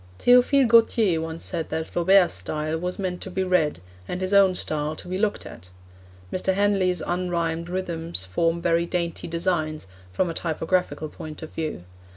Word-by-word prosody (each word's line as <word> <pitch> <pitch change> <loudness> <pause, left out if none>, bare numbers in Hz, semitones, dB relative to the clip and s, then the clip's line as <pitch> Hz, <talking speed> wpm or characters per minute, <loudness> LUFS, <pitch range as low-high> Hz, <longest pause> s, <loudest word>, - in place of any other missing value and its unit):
Theophile 250 +2 +5
Gautier 225 -6 +4
once 160 0 -5
said 165 -3 -3
that 160 0 -2
Flaubert's 180 +2 +3
style 155 - -3
was 180 +1 -3
meant 185 -2 -3
to - - -5
be 190 +1 -1
read, 170 - +1 0.3
and 180 - -4
his 185 +1 -2
own 195 -2 +5
style 155 -2 -2
to 180 - -10
be 185 +1 -3
looked 210 -1 0
at. 90 +2 -11 0.6
Mr. 190 0 0
Henley's 195 -3 +1
unrhymed 170 -2 -2
rhythms 170 - -2
form 165 - 0
very 170 0 +2
dainty 170 -2 -3
designs, 165 - -1 0.3
from 135 - 0
a 165 - -3
typographical 165 0 -1
point 155 +1 -9
of 155 - -8
view. 155 - -4
175 Hz, 170 wpm, -24 LUFS, 160-185 Hz, 0.6 s, Theophile